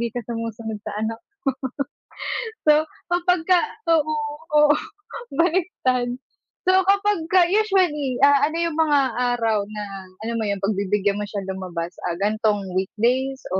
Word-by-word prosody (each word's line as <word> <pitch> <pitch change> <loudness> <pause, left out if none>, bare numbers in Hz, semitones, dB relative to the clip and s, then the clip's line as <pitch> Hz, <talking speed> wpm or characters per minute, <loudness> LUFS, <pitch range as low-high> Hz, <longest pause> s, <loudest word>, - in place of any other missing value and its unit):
di 235 - 0
ka 245 - -1
sumusunod 230 -2 -4
sa 215 - -5
anak 225 +1 -2
mo. 405 - -51 1.3
So 300 - +8 0.4
kapag 360 0 +2
ka 365 - +6 0.4
oo, 310 0 0 0.4
oo 295 0 +6 0.6
baliktad. 330 -8 +1 0.6
So 375 +1 +5
kapag 400 0 +3
ka 370 -1 +6
usually, 360 - +1
ah, 285 0 +5
ano 325 - -4
yung 325 - -6
mga 295 -3 +4 0.4
araw 220 -3 +1
na 210 -1 -5 0.4
alam 230 +1 -2
mo 220 - -1
yun 200 -1 -1
pagbibigyan 200 0 +1
mo 210 - -2
siyang 195 -2 -5
lumabas, 180 -2 -5 0.2
ah, 170 - -3
ganitong 210 0 +1
weekdays 245 +8 0
o 190 - +2
245 Hz, 145 wpm, -23 LUFS, 210-320 Hz, 1.3 s, So